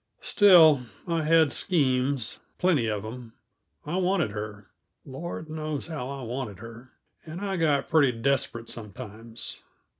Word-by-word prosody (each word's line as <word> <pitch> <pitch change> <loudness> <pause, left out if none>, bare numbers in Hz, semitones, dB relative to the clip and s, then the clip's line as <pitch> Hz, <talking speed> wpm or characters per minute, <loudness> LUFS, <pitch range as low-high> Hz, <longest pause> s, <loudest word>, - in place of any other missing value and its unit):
Still, 165 -9 +7 0.3
I 165 -1 0
had 160 -1 +4
schemes, 135 -7 0 0.2
plenty 165 -10 +2
of 105 -2 -2
them. 115 +1 -8 0.5
I 160 +5 -2
wanted 180 - +1
her 105 -1 -7 0.3
Lord 160 +4 -6
knows 155 -2 -4
how 150 -6 -5
I 140 -1 -6
wanted 120 -4 -5
her! 115 +4 -12 0.3
and 160 +2 -8
I 195 -1 -2
got 155 -5 +1
pretty 155 -6 +4
desperate, 115 -1 -1
sometimes. 110 +1 -7
135 Hz, 130 wpm, -27 LUFS, 115-160 Hz, 0.5 s, Still